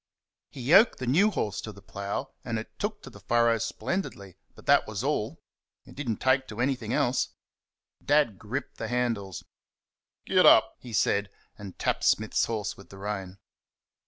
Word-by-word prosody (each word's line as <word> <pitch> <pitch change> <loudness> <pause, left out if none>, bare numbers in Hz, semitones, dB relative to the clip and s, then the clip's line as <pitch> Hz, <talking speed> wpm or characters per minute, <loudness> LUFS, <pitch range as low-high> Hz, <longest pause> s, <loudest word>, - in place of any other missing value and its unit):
He 135 - -9
yoked 185 - +6
the 130 - -4
new 170 - +4
horse 105 - -2
to 110 - -7
the 100 - -14
plough, 100 +7 -5
and 115 -2 -2
it 110 - -8
took 205 0 -3
to - - -10
the 100 - -13
furrow 115 +3 +2
splendidly 110 - -4 0.2
but - - -16
that - - +4
was - - -4
all; - - -2 0.4
it - - -14
did 140 -3 -5
n't 110 - -1
take 130 0 +2
to 110 - -8
anything 125 -3 -1
else. 125 +1 +1 0.7
Dad 145 -9 +2
gripped 125 +7 -5
the - - -4
handles 115 -7 -2 0.8
"Git - - +4
up!" - - +6
he 125 - -10
said, 100 -1 +1 0.3
and 100 -3 -10
tapped - - -1
Smith's 110 0 +2
horse 110 -3 -3
with 100 - -15
the 95 - -12
rein. 95 -2 -5
115 Hz, 175 wpm, -28 LUFS, 100-130 Hz, 0.8 s, yoked